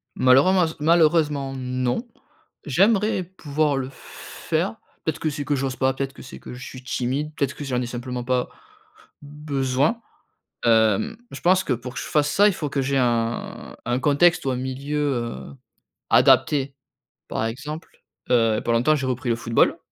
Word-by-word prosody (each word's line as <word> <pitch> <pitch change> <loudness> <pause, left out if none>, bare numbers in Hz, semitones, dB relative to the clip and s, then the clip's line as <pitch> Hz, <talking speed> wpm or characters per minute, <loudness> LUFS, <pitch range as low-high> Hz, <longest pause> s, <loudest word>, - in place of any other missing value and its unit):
Malheurense 160 +7 +4
malheureusement 150 -3 +3
non, 125 - -2 0.6
j'aimerais 195 - +2
pouvoir 150 -5 -1
le 130 -1 -3
faire, - - -4 0.3
peut-être - - -1
que 155 - 0
c'est 145 -1 -5
que 145 - +1
j'ose 135 -1 -2
pas, 130 0 +1
peut-être 135 0 -4
que - - -13
c'est 125 - -10
que - - -10
je 130 +2 -9
suis 130 0 -10
timide, 130 +4 -2
peut-être 140 -1 -1
que - - -7
j'en 125 -3 -1
ai 125 - -2
simplement 125 0 -5
pas 125 0 0 0.7
besoin. 145 - -1 0.7
Hem, 110 - +3
je - - -8
pense 185 +1 +4
que 130 - +1
pour 125 +1 -6
que - - -3
je - - -5
fasse 145 -1 +1
ça, 205 +1 +5
il 205 - +2
faut 155 -5 -4
que 140 0 -1
j'ai 135 +1 0
un 120 -2 -1
un 120 +2 0
contexte 160 +4 +3
ou 135 - +1
un - - -1
milieu, 130 +3 -4 0.2
heu, 120 +1 -5 0.6
adapté. 140 -2 +4 0.5
Par 110 - -2
exemple, 145 +8 -6 0.4
heu, 115 -3 +4
il - - +1
y - - -1
a - - -2
pas 120 - -1
longtemps 120 +7 +3
j'ai 140 -3 -2
repris 130 -1 -2
le 115 - +2
football, 115 0 +2
135 Hz, 180 wpm, -23 LUFS, 125-150 Hz, 0.7 s, ça